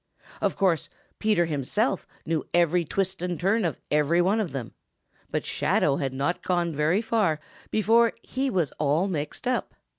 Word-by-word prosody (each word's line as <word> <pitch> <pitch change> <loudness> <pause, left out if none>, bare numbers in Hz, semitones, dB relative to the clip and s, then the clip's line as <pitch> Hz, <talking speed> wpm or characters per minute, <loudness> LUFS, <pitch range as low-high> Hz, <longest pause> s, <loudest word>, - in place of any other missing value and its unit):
Of - - +1
course, 185 -5 +1 0.3
Peter 210 -5 +3
himself 165 - -1 0.2
knew 160 -2 0
every 175 0 +3
twist 190 +2 -1
and 180 -2 -2
turn 200 +5 +2
of 170 - -1
every 150 +3 +3
one 190 +5 +3
of 205 -8 -1
them, 130 -4 -5 0.6
but - - -2
Shadow 140 -2 +1
had 135 -2 -1
not 140 +6 -1
gone 175 -2 0
very 155 +8 +2
far 210 -9 +1 0.3
before 225 +2 +4
he 265 +1 -1
was 175 - 0
all 155 +5 +2
mixed 155 - -4
up. 250 0 -1
175 Hz, 160 wpm, -26 LUFS, 150-205 Hz, 0.6 s, before